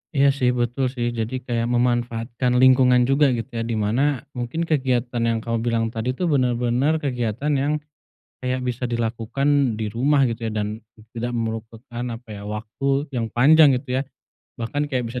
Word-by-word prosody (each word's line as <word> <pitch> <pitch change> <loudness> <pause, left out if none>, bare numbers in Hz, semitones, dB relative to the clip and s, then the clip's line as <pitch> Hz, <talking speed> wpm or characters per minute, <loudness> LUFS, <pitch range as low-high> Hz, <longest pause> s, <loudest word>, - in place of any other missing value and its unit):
Iya 140 0 +5
sih, 125 -1 +3
betul 120 +3 0
sih. 120 -1 -1
Jadi 110 +3 -2
kayak 115 -1 0
memanfaatkan 120 0 0
lingkungan 130 -1 +6
juga, 145 +2 +4
gitu 115 +4 -6
ya, - - -1
di - - 0
mana, 120 +6 +1
mungkin 125 +7 -2
kegiatan 130 -6 0
yang 115 - +1
kamu 115 0 -1
bilang 115 -1 +1
tadi 120 +3 -2
tuh, 180 - -2
benar-benar 125 +2 +2
kegiatan 125 +1 -1
yang, 145 +2 +1 0.7
kayak 130 0 -2
bisa 125 0 -3
dilakukan 120 +3 -2 0.3
di 110 - -1
rumah, 140 +3 +3
gitu 115 0 -4
ya. - - -3
Dan, 105 -1 -1 0.5
tidak 120 +1 -3
merupakan 115 +2 -5
apa 115 +1 -14
ya, 105 -1 -7
waktu 135 +7 -2
yang 115 -2 0
panjang 145 +3 +6
gitu 130 +1 -11
ya. - - +1 0.6
Bahkan 120 +6 -2
kayak 130 -4 -1
bisa 125 - -4
120 Hz, 170 wpm, -22 LUFS, 115-135 Hz, 0.7 s, lingkungan